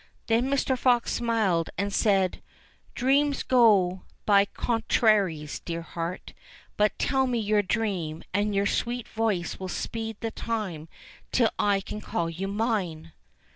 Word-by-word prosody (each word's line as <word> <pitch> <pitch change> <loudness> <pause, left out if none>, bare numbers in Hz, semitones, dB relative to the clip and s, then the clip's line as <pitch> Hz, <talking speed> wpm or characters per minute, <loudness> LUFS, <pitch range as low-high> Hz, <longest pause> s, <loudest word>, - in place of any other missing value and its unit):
'* - - -38
Then 235 +3 +2
Mr. 275 -1 +1
Fox 245 -1 +2
smiled 215 -8 +1
and 200 +1 -1
said, 195 -4 +2 0.5
"Dreams 280 +2 +2
go 200 -7 +4 0.2
by 200 -1 +5
con 225 +2 -2
traries, 190 -10 +2
dear 170 -1 -5
heart; 170 +1 -5 0.4
but 210 0 +2
tell 265 -1 +1
me 245 -1 0
your 210 -1 +2
dream, 190 -6 -2
and 205 +1 0
your 200 0 +2
sweet 240 +3 -1
voice 215 -6 -1
will 190 - -4
speed 225 +3 -4
the 225 - -3
time 190 -11 -4 0.4
till 235 -3 +3
I 200 -1 +2
can 210 +2 -7
call 170 -5 -2
you 185 +4 -4
mine." 195 -7 -2
210 Hz, 145 wpm, -27 LUFS, 185-230 Hz, 0.5 s, by